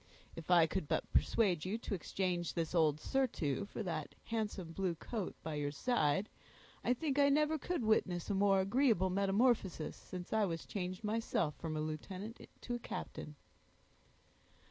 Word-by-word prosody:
"If 165 Hz, 0 st, -9 dB
I 175 Hz, -2 st, +7 dB
could 165 Hz, 0 st, -2 dB
but -, -, -1 dB
persuade 185 Hz, -9 st, +3 dB
you 195 Hz, +4 st, -1 dB
to 230 Hz, -, -5 dB
exchange 180 Hz, -2 st, -1 dB
this 165 Hz, -1 st, -1 dB
old 155 Hz, -3 st, +3 dB
surtout 200 Hz, -, 0 dB
for -, -, -4 dB
that -, -, -4 dB
handsome 210 Hz, -7 st, -3 dB
blue 180 Hz, 0 st, -1 dB
coat 200 Hz, +4 st, -4 dB
by 160 Hz, -1 st, -3 dB
your 145 Hz, -1 st, -1 dB
side, 155 Hz, -, +1 dB, 0.6 s
I -, -, +2 dB
think 290 Hz, +1 st, -1 dB
I 280 Hz, 0 st, +6 dB
never 300 Hz, +2 st, +3 dB
could 350 Hz, -2 st, -2 dB
witness 185 Hz, -5 st, +2 dB
a 205 Hz, -, 0 dB
more 195 Hz, 0 st, +4 dB
agreeable 200 Hz, -3 st, +3 dB
metamorphosis, 195 Hz, -2 st, +2 dB
since 180 Hz, +1 st, -7 dB
I 220 Hz, -1 st, +4 dB
was 165 Hz, -3 st, -3 dB
changed 185 Hz, 0 st, -4 dB
myself 210 Hz, -7 st, 0 dB
from 155 Hz, -2 st, -3 dB
a -, -, -1 dB
lieutenant 185 Hz, +8 st, -5 dB
to 245 Hz, -, -4 dB
a 240 Hz, -, -2 dB
captain." 150 Hz, -8 st, -6 dB
190 Hz, 165 wpm, -36 LUFS, 165-225 Hz, 0.6 s, I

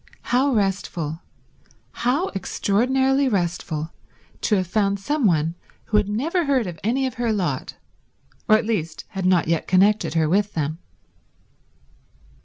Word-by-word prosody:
How 265 Hz, +3 st, +3 dB
restful, 185 Hz, -, -1 dB, 0.7 s
how 270 Hz, +10 st, 0 dB
extraordinarily 265 Hz, +8 st, +1 dB
restful 170 Hz, -5 st, -2 dB, 0.5 s
to 215 Hz, -, +2 dB
have 185 Hz, -2 st, +1 dB
found 200 Hz, +2 st, 0 dB
some 260 Hz, +5 st, +1 dB
one 160 Hz, -2 st, +1 dB, 0.3 s
who 215 Hz, -, +1 dB
had 210 Hz, -1 st, +1 dB
never 315 Hz, -, 0 dB
heard 270 Hz, -5 st, +2 dB
of 175 Hz, -4 st, -7 dB
any 255 Hz, +6 st, +1 dB
of 260 Hz, -, -2 dB
her 235 Hz, -2 st, +1 dB
lot, 195 Hz, -5 st, -2 dB, 0.7 s
or 215 Hz, -, +7 dB
at 220 Hz, -, -3 dB
least 165 Hz, -8 st, -2 dB
had 190 Hz, -3 st, -2 dB
not 180 Hz, -3 st, +3 dB
yet 165 Hz, -1 st, 0 dB
connected 195 Hz, -1 st, +3 dB
her 160 Hz, -1 st, +3 dB
with 200 Hz, +5 st, +1 dB
them. 155 Hz, +1 st, -2 dB
200 Hz, 140 wpm, -23 LUFS, 175-245 Hz, 0.7 s, or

